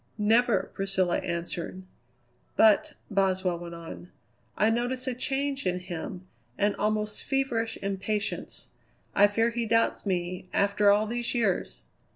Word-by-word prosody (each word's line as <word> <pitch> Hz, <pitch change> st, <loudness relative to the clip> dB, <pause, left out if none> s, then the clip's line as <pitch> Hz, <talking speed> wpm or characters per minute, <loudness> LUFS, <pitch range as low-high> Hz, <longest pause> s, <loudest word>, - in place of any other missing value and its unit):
"Never," 225 Hz, +2 st, +3 dB
Priscilla 190 Hz, -2 st, +1 dB
answered. 170 Hz, +2 st, -4 dB, 0.7 s
"But," 220 Hz, +8 st, +5 dB, 0.2 s
Boswell 190 Hz, -3 st, +1 dB
went 170 Hz, -1 st, -7 dB
on, 170 Hz, +1 st, -9 dB, 0.5 s
"I 215 Hz, +1 st, +4 dB
notice 245 Hz, +2 st, -1 dB
a 260 Hz, -, -1 dB
change 275 Hz, -1 st, -1 dB
in 180 Hz, 0 st, +1 dB
him; 180 Hz, 0 st, -6 dB, 0.3 s
an 205 Hz, 0 st, +2 dB
almost 210 Hz, 0 st, -1 dB
feverish 250 Hz, -5 st, 0 dB
impatience. 200 Hz, +2 st, -3 dB, 0.4 s
I 205 Hz, +1 st, +6 dB
fear 225 Hz, +3 st, +1 dB
he 235 Hz, -1 st, -2 dB
doubts 230 Hz, -1 st, +1 dB
me 180 Hz, 0 st, -2 dB
after 200 Hz, +1 st, +3 dB
all 205 Hz, +1 st, +4 dB
these 240 Hz, +2 st, -2 dB
years!" 215 Hz, -6 st, 0 dB
210 Hz, 130 wpm, -28 LUFS, 185-230 Hz, 0.7 s, I